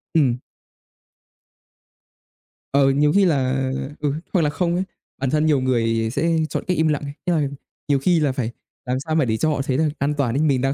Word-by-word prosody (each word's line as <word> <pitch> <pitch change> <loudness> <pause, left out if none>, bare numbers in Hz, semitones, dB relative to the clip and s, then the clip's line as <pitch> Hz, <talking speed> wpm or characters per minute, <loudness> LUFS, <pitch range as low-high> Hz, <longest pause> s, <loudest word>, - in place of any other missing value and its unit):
Ừm. 130 -6 +3 2.4
Ờ, 140 0 +4
nhiều 145 +2 +3
khi 200 - +5
là 135 -4 +1 0.3
ừ, 145 -2 0 0.2
hoặc 180 - +3
là 150 - +2
không 170 +3 0
ấy, 185 - 0 0.4
bản 135 - +1
thân 155 +2 +2
nhiều 150 -4 +3
người 115 -3 +1
sẽ 165 +5 +1
chọn - - -3
cách 180 - +1
im 160 0 +3
lặng 150 -2 0
ấy. 140 - -6
Ý 175 - +2
là 150 -4 +1 0.4
nhiều 140 -2 +2
khi 170 +4 +3
là 150 -3 +2
phải 125 -3 -3 0.3
làm 125 0 -1
sao 155 +3 -3
mà 155 - +3
để 110 -2 0
cho 155 - +1
họ 145 -2 0
thấy 135 -1 -1
là 155 -1 +2
an 145 +2 +1
toàn 125 -4 0
ấy, 140 - +1
mình 140 -5 +2
đang 135 +1 +1
140 Hz, 220 wpm, -22 LUFS, 130-155 Hz, 2.4 s, khi